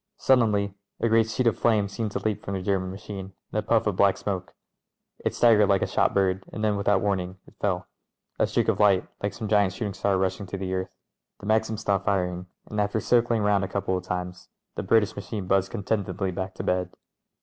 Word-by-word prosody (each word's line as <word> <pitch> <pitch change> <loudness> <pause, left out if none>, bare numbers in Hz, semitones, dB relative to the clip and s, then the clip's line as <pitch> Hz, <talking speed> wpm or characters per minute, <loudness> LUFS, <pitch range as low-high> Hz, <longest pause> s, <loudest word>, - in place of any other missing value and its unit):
Suddenly 105 - +3 0.3
a - - +2
great 115 0 +3
sheet 125 +3 -1
of 115 - +2
flame 110 -4 +3
seemed 105 +2 -3
to - - -1
leap 110 -2 -1
from 100 - -3
the 95 - -3
German 95 -1 0
machine 95 0 -7 0.2
and 110 - 0
a - - 0
puff 110 +1 +2
of 105 -3 0
black 100 -1 +4
smoke: 100 -2 -4 0.7
it - - -1
staggered 110 -4 +5
like 100 -1 +3
a - - +2
shot - - +2
bird 95 -1 +2
and 110 - -5
then, 105 -1 +2
without 100 -1 +2
warning, 95 -2 -1
it - - -18
fell 95 -3 0 0.3
— - - -48
a - - +3
streak - - 0
of - - +1
light, 100 -3 +4
like 100 - -1
some 110 +2 -5
giant 100 -3 +3
shooting 105 0 -3
star 100 0 +1
rushing 95 +2 -1
to 100 - -5
the 95 -1 -3
earth. 95 0 -2 0.5
The - - -10
Maxim 110 +1 +1
stopped 100 -2 -1
firing, 90 -2 0 0.2
and 105 -1 -2
after 105 +2 0
circling 120 -1 +2
round 100 -1 +3
a - - -1
couple 95 -1 -1
of 90 - -3
times 90 0 -5 0.2
the - - -3
British 105 +2 +2
machine 100 0 -5
buzzed 95 +1 +2
contentedly 95 -2 -2
back 95 +1 -5
to - - -5
bed. 90 0 0
100 Hz, 225 wpm, -26 LUFS, 95-105 Hz, 0.7 s, staggered